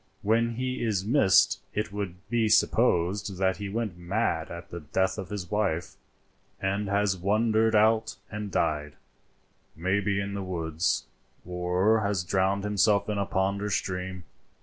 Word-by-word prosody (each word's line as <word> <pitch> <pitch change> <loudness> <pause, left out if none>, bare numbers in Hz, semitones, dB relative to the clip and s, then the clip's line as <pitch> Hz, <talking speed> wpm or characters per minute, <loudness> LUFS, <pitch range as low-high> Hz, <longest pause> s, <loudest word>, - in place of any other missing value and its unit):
When 115 +2 +2
he 125 0 -2
is 100 -4 0
missed 115 -5 +4 0.2
it 105 -1 -1
will 100 -4 -3
be 115 -1 +1
supposed 100 -3 +2
that 95 -1 +1
he 100 -1 -5
went 105 -4 -3
mad 85 -2 -1
at 85 0 -9
the 85 - -5
death 95 +6 -1
of 95 -2 -6
his 95 -4 -5
wife, 95 -6 -1 0.7
and 100 +1 -1
has 100 -1 +2
wandered 110 +4 +2
out 110 +1 +3 0.2
and 105 -1 -4
died, 75 -5 -1 0.8
maybe 100 +3 0
in 100 0 -3
the 100 - -3
woods, 85 -2 -1 0.4
or 90 +5 +1
has 100 -3 0
drowned 95 +2 +1
himself 105 0 +2
in 105 -1 -1
a 100 - -1
pond 95 +1 0
or 105 - -2
stream. 95 -1 -3
100 Hz, 150 wpm, -27 LUFS, 90-105 Hz, 0.8 s, missed